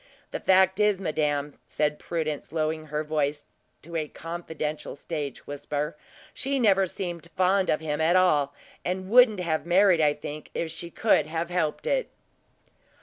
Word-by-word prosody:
The -, -, -3 dB
fact 190 Hz, +1 st, +4 dB
is, 210 Hz, -2 st, +3 dB
madame," 150 Hz, -4 st, -1 dB
said 150 Hz, 0 st, -1 dB
Prudence, 155 Hz, -5 st, -3 dB
lowering 155 Hz, 0 st, -1 dB
her 150 Hz, +1 st, -2 dB
voice 150 Hz, -1 st, -1 dB, 0.4 s
to 170 Hz, +2 st, -9 dB
a 155 Hz, -2 st, -1 dB
confidential 160 Hz, -2 st, -5 dB
stage 145 Hz, -2 st, -5 dB
whisper, 145 Hz, +1 st, -3 dB, 0.4 s
"she 275 Hz, +1 st, -1 dB
never 195 Hz, -5 st, +4 dB
seemed 170 Hz, -2 st, -5 dB
fond 190 Hz, +1 st, +3 dB
of 155 Hz, -, +2 dB
him 150 Hz, -1 st, -2 dB
at 165 Hz, +3 st, +3 dB
all, 150 Hz, -6 st, +3 dB, 0.3 s
and 185 Hz, +2 st, -3 dB
wouldn't 235 Hz, -5 st, +6 dB
have 160 Hz, -3 st, 0 dB
been 170 Hz, -, -13 dB
married, 185 Hz, -2 st, +5 dB
I 150 Hz, -1 st, +3 dB
think, 150 Hz, +1 st, -7 dB
if 165 Hz, -1 st, -2 dB
she 170 Hz, +1 st, -7 dB
could 210 Hz, -4 st, +2 dB
have 165 Hz, +2 st, -3 dB
helped 175 Hz, -, -1 dB
it." -, -, 0 dB
165 Hz, 160 wpm, -26 LUFS, 150-185 Hz, 0.4 s, wouldn't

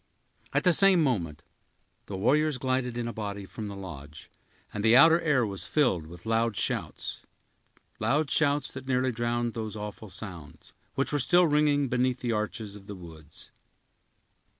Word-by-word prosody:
At -, -, +1 dB
the 180 Hz, -, +5 dB
same 190 Hz, -2 st, +5 dB
moment, 85 Hz, -, -1 dB, 0.6 s
the 100 Hz, -, -5 dB
warriors 150 Hz, +7 st, +2 dB
glided 130 Hz, -2 st, -1 dB
in 120 Hz, -1 st, -2 dB
a 120 Hz, -, -4 dB
body 100 Hz, -2 st, -5 dB
from 105 Hz, +2 st, -7 dB
the 100 Hz, -, -7 dB
lodge, 80 Hz, -6 st, -10 dB, 0.4 s
and 105 Hz, -, -3 dB
the 115 Hz, +2 st, +6 dB
outer 165 Hz, +5 st, +7 dB
air 145 Hz, -7 st, +2 dB
was 100 Hz, -2 st, -3 dB
filled 95 Hz, -, +1 dB
with 85 Hz, +3 st, -13 dB
loud 115 Hz, -1 st, 0 dB
shouts, -, -, -3 dB, 0.8 s
that 145 Hz, -2 st, +1 dB
nearly 130 Hz, 0 st, +1 dB
drowned 120 Hz, 0 st, -1 dB
those 110 Hz, -2 st, -5 dB
awful 105 Hz, 0 st, -7 dB
sounds, 90 Hz, -5 st, -9 dB, 0.2 s
which 135 Hz, +2 st, 0 dB
were 145 Hz, -, +2 dB
still 175 Hz, +7 st, +4 dB
ringing 150 Hz, -2 st, +2 dB
beneath 125 Hz, 0 st, 0 dB
the 120 Hz, -, -1 dB
arches 105 Hz, -1 st, -3 dB
of 100 Hz, -1 st, -13 dB
the 105 Hz, -, -7 dB
woods. 80 Hz, -4 st, -13 dB
115 Hz, 155 wpm, -28 LUFS, 100-135 Hz, 0.8 s, outer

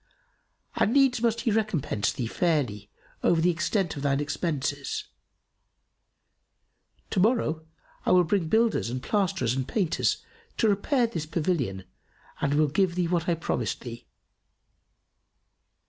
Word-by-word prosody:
And 220 Hz, -, +2 dB
needs 270 Hz, -4 st, +4 dB
must 230 Hz, -1 st, +1 dB
he 235 Hz, -, +1 dB
recompense 180 Hz, -, 0 dB
thee 125 Hz, -, -3 dB
fairly 120 Hz, -, -1 dB, 0.3 s
over 170 Hz, -, +3 dB
the 175 Hz, +2 st, +3 dB
extent 170 Hz, +2 st, -1 dB
of 140 Hz, -, -5 dB
thine 140 Hz, -1 st, +1 dB
expenses. 145 Hz, -2 st, -2 dB, 2.1 s
To -, -, +1 dB
morrow 180 Hz, -7 st, +1 dB, 0.4 s
I -, -, 0 dB
will 180 Hz, -1 st, +6 dB
bring 175 Hz, 0 st, 0 dB
builders 225 Hz, -, +2 dB
and 125 Hz, +1 st, -4 dB
plasterers 180 Hz, -, 0 dB
and 130 Hz, 0 st, -2 dB
painters 175 Hz, -4 st, 0 dB, 0.3 s
to 225 Hz, -, +3 dB
repair 235 Hz, +6 st, +2 dB
this 165 Hz, -9 st, -4 dB
pavilion 150 Hz, -, -1 dB, 0.6 s
and 145 Hz, 0 st, +1 dB
will 155 Hz, 0 st, +4 dB
give 175 Hz, +4 st, +1 dB
thee 180 Hz, -2 st, +1 dB
what 170 Hz, 0 st, 0 dB
I 170 Hz, -, +3 dB
promised 125 Hz, -, -2 dB
thee." 120 Hz, -1 st, -9 dB
165 Hz, 130 wpm, -27 LUFS, 140-200 Hz, 2.1 s, will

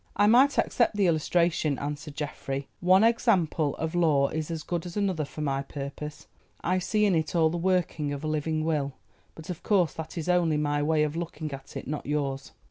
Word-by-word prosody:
"I 205 Hz, -, +4 dB
might 255 Hz, +6 st, +5 dB
accept 235 Hz, -4 st, +2 dB
the 200 Hz, -, +3 dB
illustration," 165 Hz, -2 st, +1 dB
answered 145 Hz, +1 st, -5 dB
Geoffrey; 140 Hz, -2 st, -4 dB
"one 185 Hz, +3 st, +5 dB
example 185 Hz, -, +2 dB
of 160 Hz, +1 st, -3 dB
law 155 Hz, -6 st, +3 dB
is 155 Hz, 0 st, -3 dB
as 165 Hz, -2 st, -4 dB
good 175 Hz, +1 st, -3 dB
as 175 Hz, -, -7 dB
another 190 Hz, -7 st, 0 dB
for 155 Hz, -, -8 dB
my 135 Hz, -2 st, 0 dB
purpose. 140 Hz, +2 st, -7 dB, 0.4 s
I 185 Hz, +1 st, +1 dB
see 210 Hz, +3 st, +1 dB
in 200 Hz, -, +3 dB
it 160 Hz, +1 st, 0 dB
all 160 Hz, -2 st, +4 dB
the 175 Hz, -, -2 dB
working 170 Hz, -4 st, 0 dB
of 145 Hz, +1 st, -5 dB
a -, -, -2 dB
living 155 Hz, +1 st, -1 dB
Will, 145 Hz, -4 st, 0 dB, 0.4 s
but 160 Hz, +2 st, -7 dB
of 175 Hz, -, -7 dB
course 185 Hz, -6 st, +2 dB
that 160 Hz, +2 st, -7 dB
is 165 Hz, -, -3 dB
only 175 Hz, -4 st, +3 dB
my 145 Hz, -1 st, 0 dB
way 155 Hz, +1 st, +2 dB
of 150 Hz, 0 st, -2 dB
looking 160 Hz, -3 st, -5 dB
at 135 Hz, 0 st, -8 dB
it, -, -, -7 dB
not 150 Hz, 0 st, -4 dB
yours." 140 Hz, -2 st, -2 dB
160 Hz, 210 wpm, -27 LUFS, 150-180 Hz, 0.4 s, might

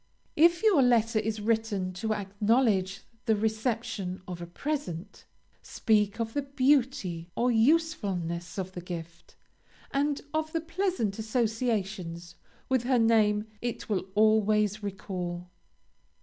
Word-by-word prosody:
If 340 Hz, +5 st, +4 dB
your 400 Hz, -10 st, +5 dB
letter 230 Hz, -3 st, +3 dB
is 215 Hz, 0 st, -2 dB
written 210 Hz, -4 st, 0 dB
to 215 Hz, +4 st, -1 dB
acknowledge 205 Hz, -1 st, +1 dB, 0.3 s
the 220 Hz, -, +4 dB
reception 220 Hz, -3 st, -2 dB
of 175 Hz, -1 st, -6 dB
a 170 Hz, -, -6 dB
present, 200 Hz, -, -5 dB, 0.4 s
speak 210 Hz, -1 st, +1 dB
of 225 Hz, -1 st, -2 dB
the 285 Hz, -, 0 dB
beauty 260 Hz, -, +1 dB
or 245 Hz, +1 st, +2 dB
usefulness 205 Hz, -, +1 dB
of 190 Hz, -1 st, -3 dB
the 180 Hz, -, -7 dB
gift, 170 Hz, -1 st, -8 dB, 0.6 s
and 285 Hz, +1 st, +1 dB
of 315 Hz, 0 st, -1 dB
the 330 Hz, -, 0 dB
pleasant 335 Hz, -, -1 dB
associations 215 Hz, -7 st, -2 dB, 0.3 s
with 260 Hz, -2 st, +2 dB
her 250 Hz, +1 st, +2 dB
name 215 Hz, -2 st, +3 dB, 0.2 s
it 240 Hz, -1 st, -4 dB
will 195 Hz, -3 st, -1 dB
always 215 Hz, -1 st, +3 dB
recall. 180 Hz, -3 st, -5 dB
215 Hz, 120 wpm, -28 LUFS, 190-250 Hz, 0.6 s, your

